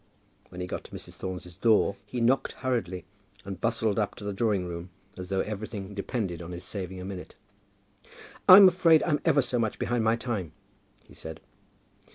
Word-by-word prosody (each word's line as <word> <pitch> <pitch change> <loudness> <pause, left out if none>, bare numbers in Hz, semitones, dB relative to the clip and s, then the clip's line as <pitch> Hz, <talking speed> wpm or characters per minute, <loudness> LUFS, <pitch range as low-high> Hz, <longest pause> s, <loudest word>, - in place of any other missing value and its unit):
When 90 - -8
he - - -2
got - - -5
to - - -13
Mrs. - - -8
Thorne's 90 -2 -6
door 110 -1 +3
he 120 +4 -4
knocked 125 +4 +2
hurriedly, 110 -9 -2 0.4
and 95 -1 -7
bustled 115 -2 +1
up 105 - -1
to - - -10
the 100 0 -3
drawing 100 -3 +1
room 85 0 -6 0.3
as 90 -1 -8
though 95 -1 +1
everything 105 -1 -5
depended 100 -4 -3
on 85 +1 -7
his 85 +1 -6
saving 95 -1 -5
a 90 - -6
minute. 95 -2 -7 1.1
"I'm 190 +1 +12
afraid 175 -3 +5
I'm 150 -3 +1
ever 145 -5 +4
so 125 0 -1
much 110 -2 -1
behind 120 -2 0
my 110 +1 +3
time," 105 -9 -4 0.5
he - - -19
said. 80 -1 -8
100 Hz, 185 wpm, -28 LUFS, 90-120 Hz, 1.1 s, I'm